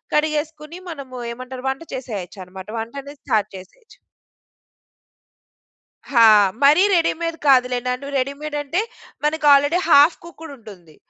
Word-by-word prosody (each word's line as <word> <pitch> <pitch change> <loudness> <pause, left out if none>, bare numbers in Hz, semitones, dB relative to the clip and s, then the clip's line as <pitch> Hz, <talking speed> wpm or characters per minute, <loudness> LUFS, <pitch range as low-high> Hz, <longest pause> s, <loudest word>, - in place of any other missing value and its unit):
కడిగేసుకొని 305 +2 -2
మనము 275 -5 -8
ఏమంటారు 255 +2 -9
వంట 270 +4 -4
చేసేయొచ్చనమాట 190 -5 -8
వంటనేది 275 +6 -8
స్టార్ట్ 215 -1 -1
జేసేయొచ్చు. 445 - -15 2.1
హా! 235 -4 +6 0.4
మరీ 300 +6 +6
రెడీమేడ్ 330 0 -1
కాదులేండి. 250 0 +1
రెడీమేడ్ 280 +3 -4
అంటే 335 +8 -1 0.4
మనకు 300 0 -1
ఆల్రెడీ 290 +5 +3
హాఫ్ 295 +2 +6
కుక్కుడ్ 325 -2 -11
ఉంటుంది. 185 -9 -15
280 Hz, 105 wpm, -20 LUFS, 240-305 Hz, 2.1 s, హా